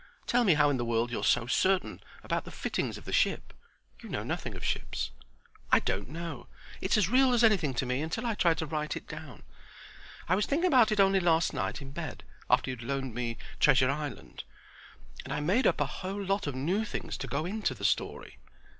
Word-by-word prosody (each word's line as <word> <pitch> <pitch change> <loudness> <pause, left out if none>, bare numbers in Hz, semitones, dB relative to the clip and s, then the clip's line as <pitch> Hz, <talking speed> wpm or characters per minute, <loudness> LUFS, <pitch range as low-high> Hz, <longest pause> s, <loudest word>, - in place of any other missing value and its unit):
Tell 245 0 +3
me 185 -8 +5
how 145 -1 +4
in 135 - 0
the 120 - -1
world 115 0 0
you're - - -3
so 120 - +3
certain 185 +9 +1 0.2
about - - -1
the - - -9
fittings - - -3
of - - -13
the - - -5
ship. - - +1 0.5
You - - -10
know - - -3
nothing - - -4
of - - -8
ships." - - -2 0.6
"I - - +8
don't 95 +4 -2
know. 160 -4 -6 0.3
It's 190 - +2
as 205 -5 +3
real 255 +3 +4
as 240 - +3
anything 180 - +3
to 130 - 0
me 125 +2 -1
until 165 +10 -3
I 230 - +1
try 170 -5 +3
to 160 - -3
write 150 0 -3
it - - -10
down. 150 - -9 0.8
I 175 - +2
was 205 +2 +1
thinking 315 +6 +1
about 245 -7 +5
it 210 - 0
only 195 0 +5
last 165 -2 +2
night 145 - -3
in 135 - -9
bed, 160 -1 -6 0.3
after 130 - +3
you 130 - -5
had 120 - -9
loaned 135 -1 -3
me 120 -1 -3 0.2
'Treasure 130 0 +5
Island'; 150 0 -6 0.8
and - - -8
I 150 - -1
made 190 - +2
up - - +2
a - - +2 0.2
whole 195 +2 -3
lot 195 -2 0
of 145 - -3
new 175 +11 0
things 215 - -5
to 135 - -5
go 140 +5 -2
into 195 -7 -2
the 100 -2 -5
story." 100 - -1
160 Hz, 220 wpm, -30 LUFS, 130-195 Hz, 0.8 s, I